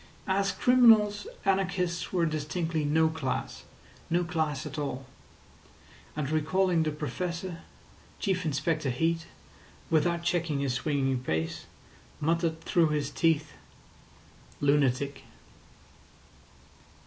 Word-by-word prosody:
As 195 Hz, +1 st, +1 dB
criminals, 220 Hz, -2 st, +5 dB, 0.2 s
anarchists 180 Hz, -3 st, 0 dB
were 175 Hz, -3 st, +2 dB
distinctly 160 Hz, +1 st, -2 dB
no 160 Hz, +2 st, +3 dB
class—no 160 Hz, +3 st, -4 dB
class 160 Hz, -5 st, -2 dB
at -, -, -5 dB
all. 135 Hz, -2 st, -3 dB, 1.1 s
And 150 Hz, -2 st, -2 dB
recalling 170 Hz, +3 st, +2 dB
the 155 Hz, -, +1 dB
Professor, 170 Hz, +4 st, -4 dB, 0.6 s
Chief 190 Hz, -3 st, 0 dB
Inspector 155 Hz, 0 st, 0 dB
Heat, 165 Hz, +6 st, 0 dB, 0.6 s
without 170 Hz, +2 st, +2 dB
checking 170 Hz, -4 st, 0 dB
his 135 Hz, -3 st, 0 dB
swinging 135 Hz, -1 st, 0 dB
pace, 80 Hz, -8 st, -3 dB, 0.5 s
muttered 165 Hz, +1 st, 0 dB
through 165 Hz, 0 st, +3 dB
his 150 Hz, -2 st, -1 dB
teeth: 160 Hz, -2 st, +1 dB, 1.1 s
"Lunatic." 140 Hz, -1 st, +1 dB
160 Hz, 95 wpm, -29 LUFS, 145-175 Hz, 1.1 s, criminals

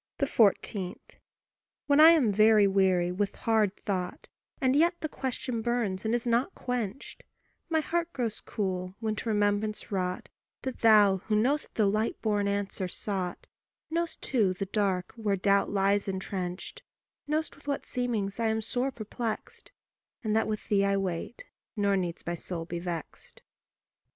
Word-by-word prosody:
14. 200 Hz, -5 st, +2 dB, 0.9 s
When 285 Hz, 0 st, +4 dB
I 315 Hz, +1 st, +10 dB
am 300 Hz, -10 st, +5 dB
very 215 Hz, 0 st, +6 dB
weary 190 Hz, -3 st, +3 dB
with 200 Hz, +2 st, -1 dB
hard 215 Hz, -3 st, +1 dB
thought, 185 Hz, -3 st, -3 dB, 0.3 s
And 260 Hz, 0 st, +2 dB
yet 340 Hz, +4 st, +4 dB
the 310 Hz, -, -1 dB
question 255 Hz, -4 st, -3 dB
burns 220 Hz, -4 st, -1 dB
and 220 Hz, +2 st, +2 dB
is 240 Hz, -, -2 dB
not 245 Hz, +9 st, +1 dB
quenched, 245 Hz, -1 st, -4 dB, 0.5 s
My 320 Hz, -1 st, +2 dB
heart 340 Hz, +2 st, -1 dB
grows 235 Hz, -7 st, -3 dB
cool 185 Hz, -2 st, -3 dB
when 220 Hz, -2 st, -1 dB
to 230 Hz, -, -3 dB
remembrance 210 Hz, 0 st, 0 dB
wrought 180 Hz, -2 st, -2 dB, 0.3 s
That 260 Hz, -1 st, -5 dB
thou 210 Hz, -4 st, +6 dB
who 215 Hz, -, +2 dB
know'st 265 Hz, +8 st, +1 dB
the 215 Hz, -, +3 dB
light 215 Hz, +3 st, 0 dB
born 205 Hz, -2 st, 0 dB
answer 200 Hz, -2 st, -2 dB
sought 185 Hz, -1 st, -4 dB, 0.5 s
Know'st 335 Hz, 0 st, -1 dB
too 210 Hz, -8 st, +1 dB
the 195 Hz, -, -3 dB
dark 195 Hz, -2 st, 0 dB
where 210 Hz, -3 st, 0 dB
the 185 Hz, -, -10 dB
doubt 200 Hz, 0 st, +3 dB
lies 200 Hz, 0 st, +2 dB
entrenched 190 Hz, -1 st, -4 dB, 0.5 s
Know'st 310 Hz, +2 st, -1 dB
with 285 Hz, -, -20 dB
what 280 Hz, -1 st, -2 dB
seemings 225 Hz, -5 st, -2 dB
I 230 Hz, -, +2 dB
am 220 Hz, 0 st, 0 dB
sore 245 Hz, +4 st, -1 dB
perplexed, 225 Hz, -1 st, -5 dB, 0.5 s
And 215 Hz, -1 st, 0 dB
that 220 Hz, -, +2 dB
with 215 Hz, -1 st, -4 dB
thee 200 Hz, -1 st, +3 dB
I 200 Hz, 0 st, +2 dB
wait, 190 Hz, +4 st, -4 dB, 0.3 s
nor 200 Hz, -2 st, +2 dB
needs 175 Hz, -3 st, -3 dB
my 175 Hz, -, -2 dB
soul 170 Hz, -1 st, -5 dB
be 175 Hz, 0 st, -4 dB
vexed. 170 Hz, -3 st, -7 dB
210 Hz, 160 wpm, -29 LUFS, 195-240 Hz, 0.9 s, I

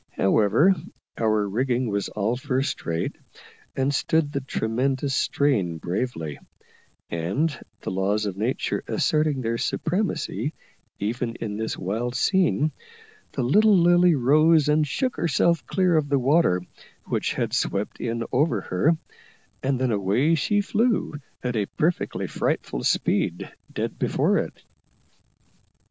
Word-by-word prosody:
However, 110 Hz, -, +4 dB, 0.4 s
our 110 Hz, -2 st, +1 dB
rigging 125 Hz, +4 st, 0 dB
was 100 Hz, -2 st, -2 dB
all 105 Hz, +3 st, -1 dB
first 130 Hz, +1 st, -2 dB
rate, 85 Hz, 0 st, -2 dB, 0.6 s
and 135 Hz, +1 st, +1 dB
stood 155 Hz, +1 st, +1 dB
the 140 Hz, -, -2 dB
tremendous 130 Hz, +3 st, -1 dB
strain 110 Hz, -, +1 dB
bravely; 80 Hz, -, -3 dB, 0.7 s
and, 100 Hz, -, -1 dB, 0.3 s
the -, -, -4 dB
laws 100 Hz, +3 st, 0 dB
of 100 Hz, -3 st, -3 dB
nature 110 Hz, +6 st, -1 dB
asserting 150 Hz, -3 st, +1 dB
their 115 Hz, -1 st, -1 dB
supremacy 160 Hz, -, -1 dB, 0.4 s
even 115 Hz, +3 st, -2 dB
in 105 Hz, -3 st, -4 dB
this 110 Hz, 0 st, -3 dB
wild 115 Hz, +7 st, -3 dB
scene, 155 Hz, -1 st, +2 dB, 0.6 s
the 135 Hz, -, -1 dB
little 205 Hz, -, +5 dB
Lily 175 Hz, 0 st, +5 dB
rose 155 Hz, +4 st, +4 dB
and 150 Hz, 0 st, +3 dB
shook 250 Hz, -, -1 dB
herself 170 Hz, +1 st, +2 dB
clear 185 Hz, -3 st, +2 dB
of 150 Hz, -2 st, +1 dB
the 140 Hz, -, +3 dB
water 130 Hz, -, +3 dB, 0.4 s
which -, -, -1 dB
had -, -, -2 dB
swept 100 Hz, +1 st, -1 dB
in 115 Hz, 0 st, -2 dB
over 135 Hz, -4 st, +2 dB
her, 150 Hz, -, +1 dB, 0.6 s
and 130 Hz, -1 st, 0 dB
then 130 Hz, -2 st, +1 dB
away 105 Hz, -, +2 dB
she 205 Hz, +6 st, +2 dB
flew, 220 Hz, +1 st, +1 dB, 0.3 s
at 125 Hz, -1 st, -2 dB
a 105 Hz, -3 st, 0 dB
perfectly 165 Hz, +3 st, 0 dB
frightful -, -, -2 dB
speed, -, -, 0 dB, 0.2 s
dead -, -, -4 dB
before -, -, +2 dB
it. -, -, -6 dB
130 Hz, 130 wpm, -24 LUFS, 105-155 Hz, 0.7 s, little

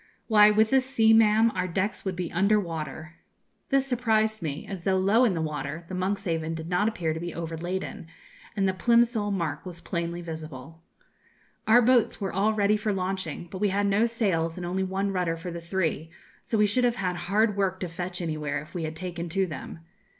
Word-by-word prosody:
Why, 210 Hz, -2 st, +6 dB
with 215 Hz, +1 st, +3 dB
this 265 Hz, -1 st, +3 dB
sea, 225 Hz, -4 st, +4 dB
ma'am, 225 Hz, +1 st, +5 dB
our 185 Hz, -1 st, -1 dB
decks 190 Hz, +4 st, -2 dB
would 190 Hz, -1 st, -2 dB
be 175 Hz, -2 st, -4 dB
under 200 Hz, +4 st, +3 dB
water.' 160 Hz, -3 st, -6 dB, 0.5 s
(This 275 Hz, 0 st, +3 dB
surprised 220 Hz, -4 st, +1 dB
me; 155 Hz, -2 st, -4 dB
as, 195 Hz, -3 st, -6 dB
though 190 Hz, +1 st, +1 dB
low 205 Hz, +6 st, +4 dB
in 205 Hz, -7 st, +1 dB
the 160 Hz, -, -1 dB
water, 150 Hz, +2 st, -4 dB
the -, -, -6 dB
'Monkshaven' 185 Hz, -4 st, -1 dB
did 160 Hz, 0 st, -6 dB
not 180 Hz, +4 st, +2 dB
appear 170 Hz, -8 st, -1 dB
to 160 Hz, -, -5 dB
be 175 Hz, +1 st, -5 dB
overladen, 170 Hz, +1 st, -4 dB, 0.5 s
and 195 Hz, -1 st, +2 dB
the 190 Hz, -, +1 dB
Plimsoll 235 Hz, 0 st, +2 dB
mark 170 Hz, -7 st, -2 dB
was 180 Hz, -2 st, -8 dB
plainly 170 Hz, 0 st, -3 dB
visible.) 160 Hz, -1 st, -8 dB, 0.9 s
'Our 240 Hz, +2 st, +6 dB
boats 245 Hz, -1 st, +3 dB
were 195 Hz, -2 st, -3 dB
all 200 Hz, +3 st, +2 dB
ready 210 Hz, 0 st, +3 dB
for 210 Hz, 0 st, -1 dB
launching, 185 Hz, -3 st, -3 dB
but 185 Hz, -, -6 dB
we 205 Hz, -, +3 dB
had 200 Hz, +1 st, +1 dB
no 200 Hz, +3 st, +3 dB
sails, 185 Hz, -8 st, 0 dB
and 180 Hz, -, -4 dB
only 185 Hz, +2 st, -1 dB
one 190 Hz, +1 st, -1 dB
rudder 180 Hz, -3 st, -1 dB
for 175 Hz, +2 st, -6 dB
the 170 Hz, 0 st, -6 dB
three; 165 Hz, -3 st, -2 dB, 0.3 s
so 225 Hz, -, -1 dB
we 210 Hz, -, +5 dB
should 230 Hz, +5 st, +1 dB
have 240 Hz, -1 st, +2 dB
had 185 Hz, -5 st, -2 dB
hard 200 Hz, +5 st, +1 dB
work 190 Hz, -2 st, 0 dB
to 180 Hz, -, -2 dB
fetch 175 Hz, +2 st, -5 dB
anywhere 155 Hz, -3 st, -2 dB
if 150 Hz, -, -12 dB
we 170 Hz, -3 st, -3 dB
had 155 Hz, 0 st, -5 dB
taken 175 Hz, 0 st, -5 dB
to 195 Hz, +3 st, +1 dB
them. 165 Hz, -1 st, -8 dB
185 Hz, 210 wpm, -27 LUFS, 165-210 Hz, 0.9 s, Why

